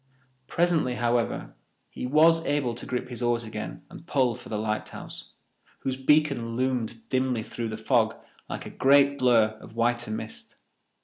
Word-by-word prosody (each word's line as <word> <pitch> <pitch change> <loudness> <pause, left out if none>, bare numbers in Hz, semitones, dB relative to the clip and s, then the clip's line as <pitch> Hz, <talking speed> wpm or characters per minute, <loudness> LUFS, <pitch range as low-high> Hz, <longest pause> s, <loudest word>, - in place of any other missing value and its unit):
Presently, 165 -7 +1
however, 120 -1 0 0.4
he - - -4
was 165 +4 +5
able 140 -4 +1
to 120 - -6
grip 125 0 -3
his 125 -1 -4
oars 120 -1 +1
again 110 -1 -6
and 165 - -13
pull 130 -6 +2
for - - -11
the 110 - -2
lighthouse, 110 0 -4 0.5
whose 130 -1 -1
beacon 135 -4 +2
loomed 120 -3 -2
dimly 130 -3 0
through 115 +1 -5
the 110 - -4
fog 110 0 +2 0.3
like - - -5
a - - -7
great 140 +1 +4
blur 115 -4 +4
of 110 - -13
whiter 120 0 +1
mist. 110 - -6
125 Hz, 160 wpm, -27 LUFS, 115-135 Hz, 0.5 s, was